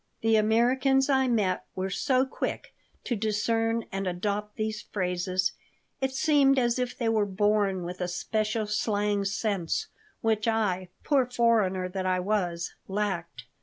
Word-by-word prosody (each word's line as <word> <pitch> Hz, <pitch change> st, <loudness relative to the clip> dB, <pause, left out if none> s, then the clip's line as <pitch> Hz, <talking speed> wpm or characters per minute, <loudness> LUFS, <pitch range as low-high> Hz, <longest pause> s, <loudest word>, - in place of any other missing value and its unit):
The 225 Hz, 0 st, +3 dB
Americans 255 Hz, +5 st, +3 dB
I 265 Hz, -1 st, +3 dB
met 205 Hz, -7 st, +1 dB
were 190 Hz, +1 st, -2 dB
so 255 Hz, +6 st, +2 dB
quick 265 Hz, -, -4 dB, 0.3 s
to 240 Hz, -, -1 dB
discern 225 Hz, +2 st, 0 dB
and 195 Hz, 0 st, -2 dB
adopt 205 Hz, +3 st, -2 dB
these 215 Hz, -1 st, -2 dB
phrases 185 Hz, 0 st, -1 dB, 0.5 s
it 265 Hz, 0 st, 0 dB
seemed 275 Hz, -1 st, +3 dB
as 240 Hz, -1 st, +2 dB
if 250 Hz, -1 st, -2 dB
they 235 Hz, -, -1 dB
were 220 Hz, -2 st, +3 dB
born 200 Hz, -1 st, +1 dB
with 180 Hz, +1 st, -6 dB
a 180 Hz, -, 0 dB
special 215 Hz, +5 st, -1 dB
slang 210 Hz, -1 st, 0 dB
sense 195 Hz, -4 st, -1 dB, 0.3 s
which 220 Hz, -1 st, +1 dB
I, 195 Hz, -5 st, 0 dB
poor 270 Hz, -4 st, +2 dB
foreigner 220 Hz, -7 st, +2 dB
that 185 Hz, 0 st, -3 dB
I 185 Hz, 0 st, +2 dB
was, 180 Hz, -3 st, -1 dB
lacked. 190 Hz, -, -3 dB
210 Hz, 145 wpm, -28 LUFS, 190-230 Hz, 0.5 s, The